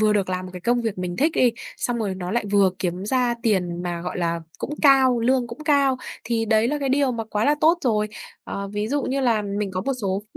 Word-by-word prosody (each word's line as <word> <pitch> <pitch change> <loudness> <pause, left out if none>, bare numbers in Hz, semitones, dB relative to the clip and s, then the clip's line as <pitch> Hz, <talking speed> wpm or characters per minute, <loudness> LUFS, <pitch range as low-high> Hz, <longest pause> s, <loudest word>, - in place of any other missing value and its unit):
vừa 215 -1 +4
được 200 -3 +1
làm 185 0 -3
một 180 - -11
cái 180 - -8
công 240 +5 +1
việc 220 -5 -3
mình 180 -1 -3
thích 310 +4 +2
đi, 245 -2 +4 0.2
xong 240 -1 -2
rồi 200 -4 -2
nó 180 -1 -5
lại 235 +1 0
vừa 200 -2 +5
kiếm 180 +1 -2
ra 245 +1 +1
tiền 180 -6 0
mà, 175 -1 -3
gọi 180 +1 -4
là, 170 -1 -1 0.2
cũng 295 - -4
cao 265 -4 +5
lương 250 +1 +2
cũng 255 +7 -9
cao, 280 -3 +3 0.3
thì 225 0 0
đấy 220 +1 +3
là 295 +1 -1
cái 275 - -1
điều 270 -1 +2
mà 225 -1 -3
quá 215 0 -1
là 295 - +4
tốt 330 +3 +4
rồi. 215 -3 +1 0.4
Ờ, 200 0 -5
ví 210 +1 -3
dụ 285 +2 0
như 275 +2 -1
là 230 -5 +2
mình 200 0 -3
có 185 - -2
một 275 +7 -1
số 195 0 -1
220 Hz, 260 wpm, -23 LUFS, 190-255 Hz, 0.4 s, vừa